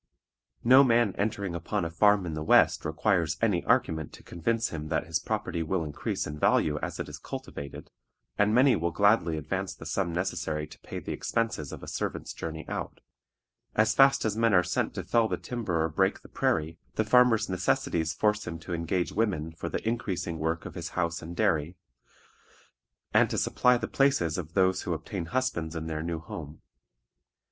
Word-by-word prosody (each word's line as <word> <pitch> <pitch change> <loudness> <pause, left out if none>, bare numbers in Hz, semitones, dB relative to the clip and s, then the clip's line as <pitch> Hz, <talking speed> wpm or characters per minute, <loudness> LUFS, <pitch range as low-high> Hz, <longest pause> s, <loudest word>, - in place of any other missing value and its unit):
No 130 +3 +8
man 120 -5 +3
entering 100 -3 -2
upon 85 +3 -2
a 85 - -4
farm 100 +2 +4
in 80 - -4
the 75 - -4
West 75 - +4
requires 85 +1 +1
any 105 -6 +1
argument 80 -2 +1
to - - -13
convince 115 +7 -1
him 80 -1 -5
that 80 0 -1
his 80 -1 -1
property 85 - -2
will 80 +2 -1
increase 75 -2 -3
in 75 0 -6
value 75 0 +2
as - - -5
it - - -3
is - - -8
cultivated, 70 -1 -8 0.4
and 105 +1 +3
many 125 +3 +5
will 85 +1 0
gladly 100 -3 +3
advance 75 - -3
the - - -11
sum 85 - -1
necessary 85 -3 -2
to 75 - -15
pay - - -8
the - - -5
expenses 115 -11 -2
of - - -8
a - - -8
servant's - - -4
journey 80 -1 -6
out. - - -5 0.8
As 110 0 +3
fast 135 0 +5
as 105 -2 0
men 115 -2 +3
are 90 - +5
sent 90 0 -1
to - - -3
fell 115 -1 +2
the - - -2
timber 100 -10 -2
or 80 - 0
break 95 +5 +1
the - - -14
prairie, 80 +1 0 0.2
the 110 - +1
farmer's 115 -1 +4
necessities 85 -3 0
force 105 +4 0
him 85 - -4
to 85 - -6
engage 85 +2 -1
women 95 -8 -1
for 80 - -6
the - - -4
increasing 90 -8 -2
work 80 +1 -1
of - - -7
his 85 -1 -5
house 85 -2 0
and 85 +1 -8
dairy, 80 +2 +1 1.4
and - - +5
to - - -2
supply 125 0 +3
the - - -3
places 115 - +2
of 80 -1 -7
those 95 -1 +3
who - - -2
obtain 85 - -5
husbands 85 -10 -1
in 80 0 -4
their 80 -1 -3
new 85 0 -3
home. 80 -1 -9
85 Hz, 190 wpm, -28 LUFS, 80-110 Hz, 1.4 s, No